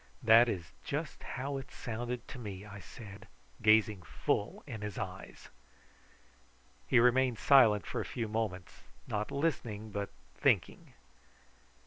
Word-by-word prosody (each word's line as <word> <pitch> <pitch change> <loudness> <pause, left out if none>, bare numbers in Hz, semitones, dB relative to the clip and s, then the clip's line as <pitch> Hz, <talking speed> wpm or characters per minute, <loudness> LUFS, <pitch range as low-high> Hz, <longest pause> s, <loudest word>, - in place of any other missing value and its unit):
"That 115 +2 +7
is 85 -7 -4
just - - -4
how 135 +2 -4
it 135 - -7
sounded 120 +1 -5
to 130 - -7
me," 100 -3 -7
I 100 -1 -9
said, 105 +1 -11 0.3
gazing 110 -2 +4
full 85 - -2
in 110 - -7
his 105 -2 -5
eyes. - - -7 1.4
He 125 - +5
remained 125 0 +4
silent 110 - +6
for - - -3
a - - -5
few 115 -2 -3
moments, 105 -5 -3 0.3
not 105 0 -2
listening 120 -8 -2
but 100 0 -3 0.2
thinking. - - 0
110 Hz, 130 wpm, -32 LUFS, 105-125 Hz, 1.4 s, That